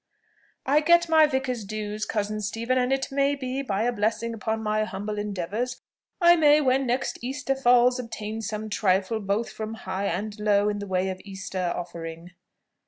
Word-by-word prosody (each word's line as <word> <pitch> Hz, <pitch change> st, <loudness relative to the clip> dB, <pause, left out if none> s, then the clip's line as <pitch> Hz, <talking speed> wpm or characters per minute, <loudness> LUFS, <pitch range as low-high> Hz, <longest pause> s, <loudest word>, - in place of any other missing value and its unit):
"I 285 Hz, +3 st, +4 dB
get 340 Hz, +2 st, +4 dB
my 315 Hz, -1 st, +6 dB
vicar's 265 Hz, -5 st, -2 dB
dues, 210 Hz, +1 st, -4 dB
cousin 215 Hz, 0 st, -2 dB
Stephen; 230 Hz, +5 st, -1 dB
and 250 Hz, +1 st, +1 dB
it 270 Hz, 0 st, 0 dB
may 280 Hz, +1 st, +2 dB
be, 265 Hz, 0 st, -3 dB
by 210 Hz, -5 st, -1 dB
a 245 Hz, -, +2 dB
blessing 225 Hz, +1 st, -1 dB
upon 220 Hz, 0 st, -3 dB
my 215 Hz, 0 st, +1 dB
humble 210 Hz, 0 st, -4 dB
endeavours, 210 Hz, +5 st, -3 dB, 0.4 s
I 345 Hz, -1 st, +7 dB
may, 300 Hz, -2 st, +5 dB
when 265 Hz, -2 st, +2 dB
next 250 Hz, +2 st, -1 dB
Easter 270 Hz, +2 st, -2 dB
falls, 250 Hz, -1 st, +4 dB
obtain 220 Hz, -2 st, -5 dB
some 215 Hz, 0 st, -4 dB
trifle 200 Hz, +1 st, +1 dB
both 205 Hz, +3 st, -1 dB
from 220 Hz, 0 st, -5 dB
high 190 Hz, -2 st, -3 dB
and 205 Hz, +4 st, -3 dB
low 210 Hz, -1 st, +3 dB
in 205 Hz, 0 st, -2 dB
the 205 Hz, -, -6 dB
way 190 Hz, 0 st, 0 dB
of 185 Hz, 0 st, -5 dB
Easter 190 Hz, -2 st, -4 dB
offering." 170 Hz, 0 st, -7 dB
220 Hz, 175 wpm, -26 LUFS, 205-255 Hz, 0.4 s, I